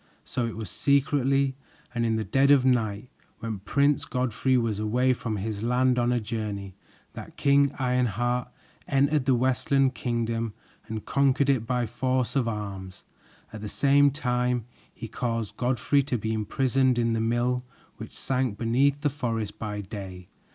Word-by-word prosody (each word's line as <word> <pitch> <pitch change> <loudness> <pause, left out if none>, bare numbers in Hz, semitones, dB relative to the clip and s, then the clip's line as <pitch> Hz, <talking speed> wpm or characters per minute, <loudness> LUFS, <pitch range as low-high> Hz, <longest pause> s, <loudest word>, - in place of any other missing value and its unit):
So 120 -2 -2
it 115 - -6
was 110 -5 -5
secretly 140 -1 +2 0.4
and 120 -1 0
in 110 - +1
the 110 - -1
dead 135 +5 +2
of 140 -2 +5
night, 115 -3 0 0.3
when 110 -3 -5
Prince 140 +8 +2
Godfrey 130 +1 0
was 115 -4 0
away 125 +4 +2
from 115 -3 -4
his 105 +1 -4
land 125 +2 +2
on 120 0 +2
a 125 - +2
journey, 105 -3 -4 0.4
that - - -10
King 140 0 +4
Ironheart 125 -1 0 0.4
entered 140 0 +2
the 135 -2 +4
Westland 130 +2 +2
Kingdom 115 -2 -2 0.3
and 110 -2 -5
conquered 140 0 +2
it 115 -4 -1
by 125 -1 0
force 130 +2 -1
of 130 -4 +1
arms. 100 -4 -5 0.5
At 110 - -7
the 105 - -5
same 140 +3 +4
time 125 -4 -1 0.3
he 115 - -8
caused 115 -2 -3
Godfrey 130 +3 +2
to 135 -2 -2
be 110 +1 -2
imprisoned 130 +4 +1
in 115 -1 +1
the 115 - 0
mill 120 +2 0 0.3
which - - -9
sank 130 -5 -1
beneath 135 +5 +2
the 145 - +2
forest 115 -7 -3
by 105 -2 -4
day. 95 -3 -8
125 Hz, 160 wpm, -26 LUFS, 110-130 Hz, 0.5 s, of